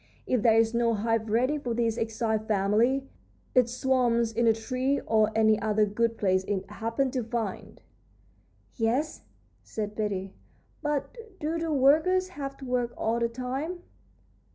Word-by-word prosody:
If 250 Hz, -4 st, +1 dB
there 225 Hz, -1 st, +5 dB
is 225 Hz, 0 st, +3 dB
no 235 Hz, -1 st, +2 dB
hive 225 Hz, +1 st, 0 dB
ready 255 Hz, +7 st, +1 dB
for 245 Hz, -5 st, -3 dB
this 230 Hz, -1 st, +1 dB
exiled 220 Hz, -1 st, -1 dB
family, 220 Hz, +6 st, +2 dB, 0.5 s
it 250 Hz, -3 st, +4 dB
swarms 240 Hz, -2 st, +1 dB
in 230 Hz, +1 st, +2 dB
a -, -, +7 dB
tree 255 Hz, +5 st, -1 dB
or 215 Hz, -1 st, +2 dB
any 220 Hz, -1 st, +4 dB
other 215 Hz, 0 st, +2 dB
good 230 Hz, +2 st, 0 dB
place 185 Hz, -2 st, +2 dB
it 195 Hz, -1 st, -2 dB
happens 230 Hz, +5 st, -1 dB
to 255 Hz, -3 st, -1 dB
find." 225 Hz, -3 st, -5 dB, 0.9 s
"Yes," 245 Hz, +7 st, -1 dB, 0.4 s
said 210 Hz, -1 st, -5 dB
Betty; 195 Hz, -3 st, -3 dB, 0.5 s
"but 295 Hz, -, -2 dB, 0.2 s
do 320 Hz, +2 st, -2 dB
the 330 Hz, -1 st, -2 dB
workers 315 Hz, +7 st, +3 dB
have 275 Hz, -6 st, -6 dB
to 270 Hz, -, -9 dB
work 245 Hz, -1 st, -1 dB
all 230 Hz, +1 st, 0 dB
the 235 Hz, 0 st, +1 dB
time?" 265 Hz, +9 st, -4 dB
235 Hz, 155 wpm, -28 LUFS, 220-265 Hz, 0.9 s, a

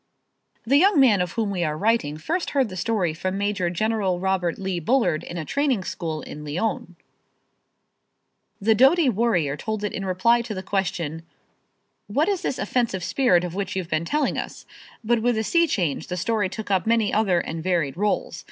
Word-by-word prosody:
The 270 Hz, +5 st, +4 dB
young 375 Hz, 0 st, +5 dB
man 225 Hz, -8 st, +5 dB
of 180 Hz, -1 st, -2 dB
whom 220 Hz, -3 st, -1 dB
we 180 Hz, -3 st, -1 dB
are 155 Hz, -1 st, -1 dB
writing 205 Hz, -7 st, +1 dB
first 335 Hz, -, -2 dB
heard 260 Hz, -5 st, +3 dB
the 185 Hz, -, -8 dB
story 185 Hz, -4 st, 0 dB
from 185 Hz, +4 st, -3 dB
Major 200 Hz, -3 st, 0 dB
General 195 Hz, -1 st, 0 dB
Robert 185 Hz, -2 st, 0 dB
Lee 190 Hz, -2 st, -2 dB
Bullard 175 Hz, -, +1 dB
in 175 Hz, -, -7 dB
a 160 Hz, -, -4 dB
training 275 Hz, -, 0 dB
school 160 Hz, -4 st, -4 dB
in 150 Hz, -, -8 dB
Lyons. 175 Hz, +3 st, -3 dB, 1.6 s
The 220 Hz, +2 st, +3 dB
doughty 270 Hz, +6 st, +5 dB
warrior 190 Hz, -, +1 dB
told 215 Hz, +6 st, -4 dB
it 210 Hz, -, -2 dB
in 195 Hz, -, -4 dB
reply 195 Hz, +6 st, +2 dB
to 230 Hz, -2 st, -6 dB
the 185 Hz, -, -5 dB
question, 175 Hz, -5 st, -2 dB, 0.9 s
"What -, -, +1 dB
is 395 Hz, -3 st, 0 dB
this -, -, -2 dB
offensive 205 Hz, -3 st, -1 dB
spirit 180 Hz, -9 st, +2 dB
of 175 Hz, -2 st, -4 dB
which 195 Hz, -1 st, -3 dB
you've 185 Hz, -3 st, -3 dB
been 155 Hz, +1 st, 0 dB
telling 295 Hz, -, 0 dB
us?" -, -, -7 dB, 0.4 s
But 235 Hz, +1 st, +1 dB
with 240 Hz, 0 st, +1 dB
a 220 Hz, -, 0 dB
sea 335 Hz, +8 st, +3 dB
change 175 Hz, -, -1 dB
the 180 Hz, -, -4 dB
story 205 Hz, +1 st, 0 dB
took 205 Hz, +2 st, -6 dB
up 190 Hz, +2 st, +1 dB
many 225 Hz, -2 st, +2 dB
other 195 Hz, -5 st, +2 dB
and 165 Hz, -1 st, -4 dB
varied 165 Hz, -6 st, 0 dB
rôles. 205 Hz, +3 st, -1 dB
195 Hz, 190 wpm, -24 LUFS, 175-230 Hz, 1.6 s, young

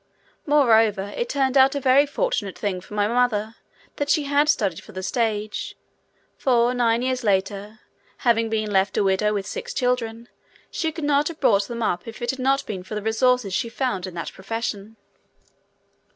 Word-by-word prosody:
Moreover, 225 Hz, -8 st, +3 dB
it 240 Hz, -, -2 dB
turned 270 Hz, -2 st, 0 dB
out 270 Hz, +1 st, +5 dB
a -, -, 0 dB
very 275 Hz, +2 st, +4 dB
fortunate 285 Hz, -, -2 dB
thing 190 Hz, -3 st, -2 dB
for 210 Hz, -, -11 dB
my 205 Hz, 0 st, +2 dB
mother 230 Hz, -2 st, 0 dB, 0.4 s
that 285 Hz, 0 st, -2 dB
she 300 Hz, 0 st, +3 dB
had 285 Hz, +1 st, +2 dB
studied 200 Hz, -, +1 dB
for -, -, -15 dB
the 190 Hz, 0 st, -6 dB
stage, 215 Hz, 0 st, -2 dB, 0.6 s
for 245 Hz, -2 st, +2 dB
nine 235 Hz, -1 st, +1 dB
years 255 Hz, -1 st, -1 dB
later, 200 Hz, +1 st, -1 dB, 0.4 s
having 230 Hz, -1 st, +3 dB
been 215 Hz, -1 st, -1 dB
left 195 Hz, 0 st, +1 dB
a -, -, +3 dB
widow 195 Hz, +2 st, +2 dB
with 200 Hz, -2 st, -2 dB
six 485 Hz, +1 st, -6 dB
children, 235 Hz, -, -1 dB, 0.4 s
she 320 Hz, -1 st, -1 dB
could 320 Hz, 0 st, -7 dB
not 290 Hz, 0 st, +2 dB
have 335 Hz, -2 st, -6 dB
brought 200 Hz, -7 st, +3 dB
them 235 Hz, -1 st, -4 dB
up 175 Hz, -2 st, -1 dB
if 225 Hz, -, -8 dB
it 240 Hz, -, -1 dB
had 265 Hz, -, -9 dB
not 270 Hz, +2 st, +1 dB
been 195 Hz, -4 st, -5 dB
for 190 Hz, +4 st, -7 dB
the 210 Hz, -, -3 dB
resources 225 Hz, -1 st, +1 dB
she 230 Hz, +4 st, -1 dB
found 225 Hz, -7 st, -2 dB
in 180 Hz, -, -9 dB
that 170 Hz, -, -5 dB
profession. 220 Hz, +1 st, -5 dB
230 Hz, 185 wpm, -23 LUFS, 205-265 Hz, 0.6 s, out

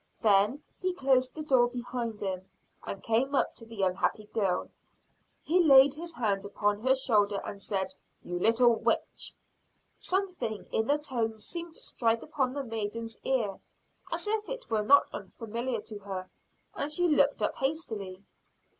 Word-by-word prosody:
Then, 210 Hz, +7 st, +4 dB, 0.2 s
he 370 Hz, -1 st, -1 dB
closed 260 Hz, -4 st, +2 dB
the 310 Hz, -, -4 dB
door 260 Hz, -5 st, +4 dB
behind 240 Hz, -2 st, -4 dB
him, 190 Hz, -1 st, -3 dB, 0.3 s
and 195 Hz, -, -6 dB
came 250 Hz, +5 st, +1 dB
up -, -, +2 dB
to 230 Hz, -, -11 dB
the 225 Hz, -4 st, -4 dB
unhappy 190 Hz, +3 st, 0 dB
girl. 195 Hz, -5 st, 0 dB, 0.7 s
He 350 Hz, +3 st, +3 dB
laid 270 Hz, -2 st, +8 dB
his 335 Hz, +2 st, -6 dB
hand 205 Hz, -4 st, 0 dB
upon 205 Hz, +1 st, 0 dB
her 260 Hz, +2 st, +4 dB
shoulder 210 Hz, -6 st, +2 dB
and 200 Hz, -, -7 dB
said: 190 Hz, -2 st, -2 dB, 0.3 s
"You 175 Hz, 0 st, -4 dB
little 235 Hz, +4 st, +5 dB
witch!" -, -, -1 dB, 0.6 s
Something 360 Hz, -, -2 dB
in 220 Hz, -, +1 dB
the 290 Hz, -, +3 dB
tone 235 Hz, -7 st, -2 dB
seemed 335 Hz, +8 st, -5 dB
to -, -, -10 dB
strike 230 Hz, -1 st, 0 dB
upon 265 Hz, -4 st, -1 dB
the 280 Hz, -, -2 dB
maiden's 225 Hz, -1 st, -4 dB
ear 225 Hz, -7 st, 0 dB, 0.5 s
as -, -, -2 dB
if 425 Hz, 0 st, 0 dB
it -, -, -6 dB
were 220 Hz, -1 st, +2 dB
not 280 Hz, +7 st, +6 dB
unfamiliar 235 Hz, +1 st, -4 dB
to 215 Hz, -1 st, -8 dB
her; 190 Hz, -2 st, -6 dB, 0.4 s
and 290 Hz, -, -3 dB
she 355 Hz, +3 st, +3 dB
looked 290 Hz, -3 st, +3 dB
up -, -, 0 dB
hastily. 220 Hz, -, -3 dB
235 Hz, 160 wpm, -30 LUFS, 205-280 Hz, 0.7 s, laid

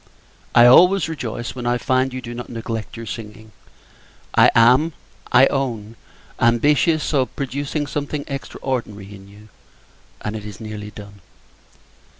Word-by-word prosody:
I 120 Hz, -, +8 dB
always 180 Hz, +10 st, +6 dB
rejoice 120 Hz, -7 st, -5 dB
when 125 Hz, -2 st, -5 dB
I 120 Hz, 0 st, +2 dB
find 130 Hz, +1 st, 0 dB
you 130 Hz, 0 st, -6 dB
do 120 Hz, +1 st, -7 dB
not 120 Hz, 0 st, -7 dB
neglect 115 Hz, -1 st, -6 dB
your 115 Hz, -, -7 dB
singing. 110 Hz, 0 st, -9 dB, 0.8 s
I -, -, +6 dB
am, 125 Hz, +8 st, +5 dB, 0.4 s
I 125 Hz, +2 st, +7 dB
own, 115 Hz, -6 st, -3 dB, 0.4 s
ambitious 145 Hz, +7 st, +2 dB
of 130 Hz, -3 st, 0 dB
producing 140 Hz, +2 st, -3 dB
something 145 Hz, 0 st, -4 dB
extraordinary 120 Hz, -7 st, -5 dB
in 100 Hz, -1 st, -13 dB
you, 105 Hz, +2 st, -17 dB, 0.7 s
and 105 Hz, +1 st, -4 dB
it 105 Hz, -, -6 dB
is 105 Hz, -2 st, -9 dB
nearly 105 Hz, -1 st, -7 dB
done. 100 Hz, -1 st, -12 dB
120 Hz, 140 wpm, -20 LUFS, 110-135 Hz, 0.8 s, I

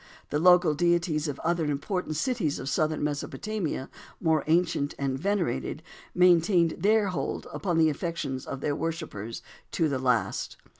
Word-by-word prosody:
The 150 Hz, -, +1 dB
local 180 Hz, -1 st, +6 dB
deities 170 Hz, -1 st, +1 dB
of 145 Hz, -2 st, -4 dB
other 170 Hz, 0 st, 0 dB
important 155 Hz, +3 st, -2 dB
cities 180 Hz, -, 0 dB
of -, -, -6 dB
southern 155 Hz, +2 st, 0 dB
Mesopotamia, 150 Hz, +1 st, -3 dB, 0.3 s
more 160 Hz, -3 st, +2 dB
ancient 160 Hz, -3 st, +1 dB
and 135 Hz, -1 st, -1 dB
venerated, 165 Hz, -3 st, -1 dB, 0.3 s
maintained 175 Hz, -1 st, +4 dB
their 210 Hz, 0 st, +3 dB
hold 180 Hz, -, -3 dB
upon 175 Hz, -4 st, -1 dB
the 160 Hz, -1 st, +5 dB
affections 145 Hz, -4 st, -4 dB
of 135 Hz, -, -5 dB
their 145 Hz, 0 st, 0 dB
worshippers 155 Hz, -, -4 dB, 0.3 s
to 165 Hz, -, +2 dB
the 140 Hz, -3 st, -1 dB
last. 125 Hz, -2 st, 0 dB
160 Hz, 145 wpm, -27 LUFS, 145-180 Hz, 0.3 s, local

